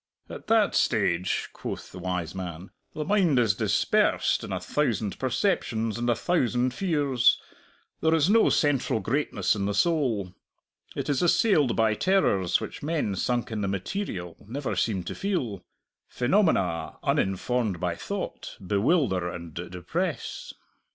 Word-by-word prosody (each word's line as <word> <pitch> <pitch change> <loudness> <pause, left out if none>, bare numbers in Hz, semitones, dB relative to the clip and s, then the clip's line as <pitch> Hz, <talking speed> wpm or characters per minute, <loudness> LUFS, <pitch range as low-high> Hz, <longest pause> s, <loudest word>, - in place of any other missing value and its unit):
"At - - -9
that 220 -2 +3
stage," 95 -6 +1
quoth - - -6
the 90 - -9
wise 90 -2 -3
man, 90 -1 -7 0.2
"the 150 - -3
mind 180 -7 +3
is 115 -5 +4
dispersed - - +2
in - - -6
a - - -1
thousand 105 -3 -1
perceptions 120 - 0
and 120 0 0
a 120 - +3
thousand 125 -7 +1
fears; 145 -8 +2 0.6
there 160 0 +3
is 160 -1 +3
no 225 +3 +5
central 140 -7 +1
greatness 110 -3 0
in 100 -2 -2
the 100 0 -1
soul. 125 - +1 0.6
It - - -3
is 140 -2 +1
assailed 170 - +3
by 110 -1 +3
terrors 105 - +2
which - - -7
men 145 -10 -1
sunk 120 +4 -1
in 110 -1 -2
the 100 - -1
material 95 - -4
never 135 +4 -3
seem 100 -6 0
to - - -5
feel. 130 - -2 0.5
Phenomena, 120 - +1
uninformed 100 0 0
by 90 -1 -1
thought, 200 - -6
bewilder 100 - +1
and 85 -2 -8
depress." 90 - -4
120 Hz, 140 wpm, -27 LUFS, 95-155 Hz, 0.6 s, no